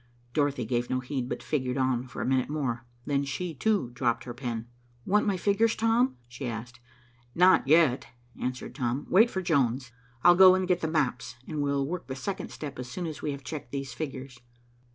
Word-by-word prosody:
Dorothy 145 -5 +1
gave 120 +1 -1
no 130 - 0
heed, 130 -1 -3
but - - -4
figured 130 -3 -1
on 130 -1 0
for - - -5
a - - -2
minute 130 0 +1
more. 130 -5 -2 0.2
Then 140 -1 +1
she, 165 +5 -3
too, 190 - 0
dropped 120 -1 0
her 120 - -6
pen. 120 -3 -4 0.4
"Want 210 +2 +2
my 195 -2 +1
figures, 210 +4 +2
Tom?" 230 - +2
she 120 +2 -6
asked. 120 +1 -6 0.6
"Not 180 -5 +5
yet," 150 -4 +4 0.3
answered 125 0 -4
Tom. 125 0 -2
"Wait 220 +6 +6
for 190 -3 -3
Jones. 130 -7 +1 0.3
I'll 175 +1 +8
go 185 +1 +8
and 185 -1 0
get 180 -1 +1
the 160 - 0
maps, 140 -5 -1
and 155 -2 -3
we'll 140 -1 +1
work 175 +4 -5
the 130 - -4
second 190 +9 -4
step 145 -4 -7
as 125 0 -6
soon 175 +8 -4
as 155 -2 -6
we - - -2
have 140 -1 -7
checked 140 -3 -7
these 135 -2 -4
figures." 135 -4 -6
140 Hz, 200 wpm, -28 LUFS, 125-170 Hz, 0.6 s, I'll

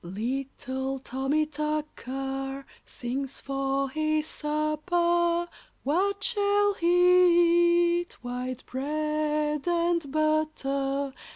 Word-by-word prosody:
] - - -39
Little 260 +6 -3
Tommy 270 +4 -1
Tucker, 275 -3 -4 0.2
Sings 265 +2 -4
for 275 0 -1
his 310 +1 0
supper. 340 +3 0 0.4
What 395 +7 0
shall 410 -2 +2
he 345 -1 +4
eat? 350 - -11
White 250 +1 -4
bread 300 +2 -1
and 340 -3 +1
butter. 280 -3 0
305 Hz, 85 wpm, -27 LUFS, 270-345 Hz, 0.4 s, he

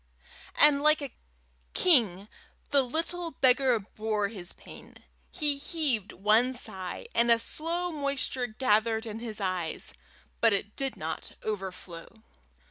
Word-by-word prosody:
And 290 -1 +5
like 305 +1 +4
a 275 - -6 0.6
king 215 - +3 0.4
the 285 -1 +5
little 330 +6 -1
beggar 260 -2 +4
bore 215 0 -2
his 190 -5 -4
pain. - - -13 0.3
He 295 -4 0
heaved 280 - 0
one 220 +6 +3
sigh, 190 - -4
and 235 0 +3
a 235 - +7
slow 335 +9 -2
moisture 280 -4 -1
gathered 220 -1 +1
in 220 0 -6
his 225 -2 -7
eyes, 185 -4 -2 0.5
but 230 -2 +4
it 200 +1 -2
did 270 -1 -3
not - - -5
overflow. 190 -5 -5
235 Hz, 125 wpm, -29 LUFS, 210-280 Hz, 0.6 s, a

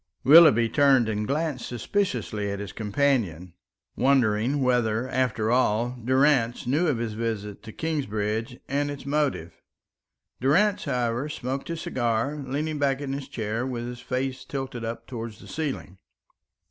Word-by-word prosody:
Willoughby 145 -6 +8
turned 135 -1 +4
and 105 -1 -2
glanced 150 -3 -2
suspiciously 120 - -2
at 100 - -3
his 100 0 -6
companion, 105 - 0 0.4
wondering 130 0 +2
whether, 120 -2 +1
after 125 -4 0
all, 120 0 +2
Durrance 130 -2 +2
knew 150 +8 +2
of 145 -6 +1
his 115 -2 -3
visit 105 -2 -4
to 110 - -10
Kingsbridge 115 -6 -2
and 145 +2 0
its 145 -2 -7
motive. 140 - -1 0.8
Durrance, 185 - +2
however, 125 0 -1
smoked 135 -1 -4
his 165 -1 -4
cigar, 120 +3 -1
leaning 145 +2 -3
back 140 -1 +1
in 140 -2 -4
his 140 -1 -5
chair 115 -3 -3
with 125 -2 -3
his 120 0 -6
face 130 +1 -3
tilted 135 -4 -5
up 115 0 -5
towards 115 -3 -6
the - - -14
ceiling. 140 - -4
125 Hz, 145 wpm, -26 LUFS, 115-140 Hz, 0.8 s, Willoughby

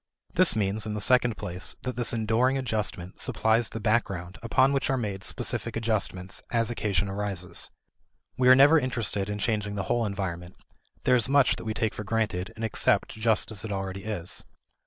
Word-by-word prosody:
This - - +5
means, 105 +1 0
in 105 - -3
the - - -3
second 120 0 +3
place, 90 +4 -4
that 125 - -4
this 120 -1 0
enduring 115 +4 +1
adjustment 105 -7 -3
supplies 110 +1 +1
the 115 - -6
background 105 -4 -1
upon 130 +4 +3
which 140 +1 0
are 135 - +1
made 100 -5 -4
specific 115 - -2
adjustments, 105 -5 -1
as 115 0 +1
occasion 100 -4 -1
arises. 95 -2 -1 0.7
We 125 0 +3
are 130 - +9
never 145 +4 +7
interested 115 -7 -2
in 105 - -3
changing 105 -1 -1
the 100 - -2
whole 115 +3 0
environment; 90 -3 -5 0.5
there 125 - +4
is 120 0 +5
much 140 -1 +4
that - - -9
we 110 -1 -3
take 110 0 -1
for 105 - -6
granted 100 -4 -2
and 115 - -4
accept 110 - +2
just 110 0 +1
as 105 -3 -4
it 110 - -5
already 95 -1 -4
is. 95 -5 -2
110 Hz, 185 wpm, -27 LUFS, 100-120 Hz, 0.7 s, are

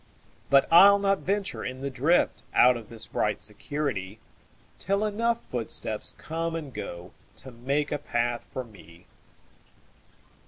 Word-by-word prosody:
But 140 0 +5
I'll 200 +4 +9
not 195 -1 +1
venture 200 +1 -2
in 130 +1 -6
the 140 0 -3
driftOut 130 -3 +3
of 115 -3 -9
this 115 -1 -6
bright 105 -2 -1
security, 105 -3 -3 0.6
Till 200 +2 0
enough 230 +2 -1
footsteps 110 -2 -1
come 165 +1 -4
and 150 -5 -6
goTo 90 +9 -10
make 145 +3 0
a - - -1
path 120 0 -2
for 130 - -6
me. 85 -6 -17
135 Hz, 125 wpm, -27 LUFS, 115-170 Hz, 0.6 s, I'll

